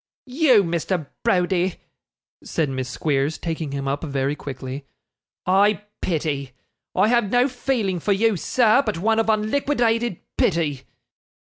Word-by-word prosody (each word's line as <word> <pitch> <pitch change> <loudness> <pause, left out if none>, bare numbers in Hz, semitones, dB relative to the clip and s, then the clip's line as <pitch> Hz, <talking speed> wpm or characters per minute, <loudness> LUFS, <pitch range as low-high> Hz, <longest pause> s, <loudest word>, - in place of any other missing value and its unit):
'You, 255 -5 +4
Mr. 170 -1 -1 0.2
Browdie,' 185 -4 +1 0.7
said 155 -4 -1
Miss 130 -1 -3
Squeers, 145 +2 0
taking 160 -3 -4
him 140 0 -3
up 140 +3 -2
very 140 -1 -1
quickly, 135 0 -7 0.6
'I 200 +3 +3 0.2
pity. 145 -6 -2 0.4
I - - +4
have 235 -4 +2
no 245 +3 +3
feeling 240 -8 -1
for 200 - -1
you, 215 +2 +3
sir, 235 - +3
but 215 -7 -2
one 220 +5 +2
of 225 - +1
unliquidated 230 - +1 0.2
pity. 150 -6 +1
185 Hz, 130 wpm, -22 LUFS, 145-225 Hz, 0.7 s, You